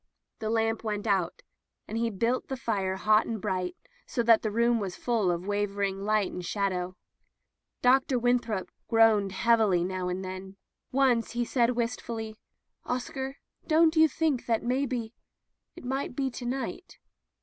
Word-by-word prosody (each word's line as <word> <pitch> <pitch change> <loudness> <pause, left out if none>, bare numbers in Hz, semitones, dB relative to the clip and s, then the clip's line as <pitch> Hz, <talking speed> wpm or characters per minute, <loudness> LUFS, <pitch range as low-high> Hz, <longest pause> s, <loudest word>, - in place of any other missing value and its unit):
The 215 - -2
lamp 225 0 0
went 210 -1 -2
out, 190 -5 0 0.4
and 215 - -5
he 230 0 +1
built 230 +5 0
the 265 - -4
fire 195 -6 -1
hot 215 +2 +3
and 225 -2 -3
bright, 185 -1 -2 0.3
so 235 - -1
that 230 -1 +6
the 215 - -1
room 235 +2 +2
was 190 -4 -4
full 230 -6 0
of 175 +1 -1
wavering 200 -1 -1
light 215 -2 +2
and 180 - -6
shadow. 185 -1 -2 0.9
Dr. 260 +1 +4
Winthrop 240 -5 0 0.2
groaned 225 -4 +4
heavily 195 -2 +3
now 185 0 -2
and 185 +1 -3
then. 185 +1 -7 0.4
Once 255 -4 +2
he 240 0 0
said 240 0 +2
wistfully: 230 -2 -3 0.5
"Oscar, 265 +2 -4 0.3
don't 320 0 +4
you 320 0 +7
think 305 -3 -1
that 225 -2 +1
maybe 245 -2 -1 0.3
— - - -49
^it - - -10
might 265 0 -3
be 270 -1 -1
to 245 0 -6
night 265 +7 -4
225 Hz, 160 wpm, -28 LUFS, 195-245 Hz, 0.9 s, you